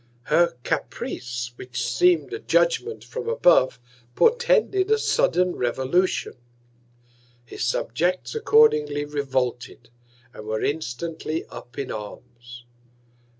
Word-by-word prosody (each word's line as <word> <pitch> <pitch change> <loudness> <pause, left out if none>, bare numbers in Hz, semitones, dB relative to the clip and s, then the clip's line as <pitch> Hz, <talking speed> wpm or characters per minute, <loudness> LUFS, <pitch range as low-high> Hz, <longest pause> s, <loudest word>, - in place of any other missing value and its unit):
Her 170 -7 +3
Caprice, 120 0 -4
which 125 -1 -4
seem'd 360 +2 +2
a 420 - -4
Judgement 455 -1 +1
from 465 -1 -5
above, 170 - +4 0.4
portended 470 -5 +3
a 440 - +4
sudden 180 - +1
Revolution. 130 +9 0 1.1
His 115 - -6
Subjects 155 +9 -1
accordingly 290 - +3
revolted, 130 -5 -3 0.4
and 105 - -10
were 110 0 -2
instantly 160 +2 -3
up 120 +1 -11
in 140 - -4
Arms. 120 +3 -10
150 Hz, 100 wpm, -24 LUFS, -, 1.1 s, above